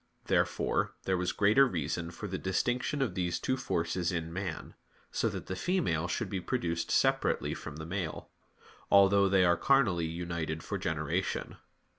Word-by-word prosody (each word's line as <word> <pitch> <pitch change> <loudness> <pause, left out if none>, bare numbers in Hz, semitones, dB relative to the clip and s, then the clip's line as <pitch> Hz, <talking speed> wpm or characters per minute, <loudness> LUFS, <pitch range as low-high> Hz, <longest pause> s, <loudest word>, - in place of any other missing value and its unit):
Therefore - - +1
there 95 - +1
was 90 0 0
greater 110 +7 +5
reason 85 - -2
for 105 +4 -7
the 95 -1 -4
distinction 125 +9 0
of 115 -9 -2
these 90 -2 -1
two 130 - 0
forces 85 -6 -1
in 85 -1 -3
man; 95 -3 -5 0.4
so - - 0
that - - -6
the 95 - -4
female 90 - 0
should 110 +5 -2
be 95 -1 -3
produced 85 -8 -2
separately - - +2
from 80 - -7
the 80 0 -7
male; 90 -2 -4 0.6
although 100 0 +6
they 95 -1 +4
are 85 0 +4
carnally 105 - +3
united 85 -1 -4
for - - -3
generation. 80 +3 -2
90 Hz, 160 wpm, -31 LUFS, 85-100 Hz, 0.6 s, although